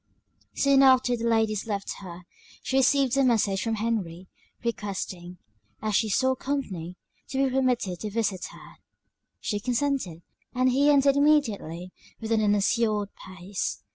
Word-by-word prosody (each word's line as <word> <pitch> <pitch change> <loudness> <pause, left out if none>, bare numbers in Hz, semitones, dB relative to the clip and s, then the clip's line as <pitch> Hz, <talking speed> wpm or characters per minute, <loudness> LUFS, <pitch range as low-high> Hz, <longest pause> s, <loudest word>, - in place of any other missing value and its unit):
Soon 275 -1 +4
after 260 -2 +5
the 235 0 -2
ladies 220 -2 +1
left 200 -2 -3
her, 180 -2 -10 0.4
she 265 - 0
received 270 -1 +3
a 275 - +4
message 210 -6 +2
from 225 -1 -1
Henry, 205 -6 -3 0.4
requesting, 190 -5 -4 0.4
as 215 -1 -2
she 220 - +2
saw 260 +5 +2
company, 205 - -4 0.3
to 270 0 +1
be 260 - -2
permitted 245 -9 0
to 215 - -4
visit 205 -3 -2
her: - - -13 0.6
she 205 - -2
consented, 245 - -2 0.3
and 255 0 +3
he 280 +3 +3
entered 280 -1 +4
immediately, 210 - +1 0.3
with 225 0 -5
an 225 -1 +3
unassured 210 0 +1
pace. 185 +1 -5
225 Hz, 140 wpm, -26 LUFS, 195-260 Hz, 0.6 s, after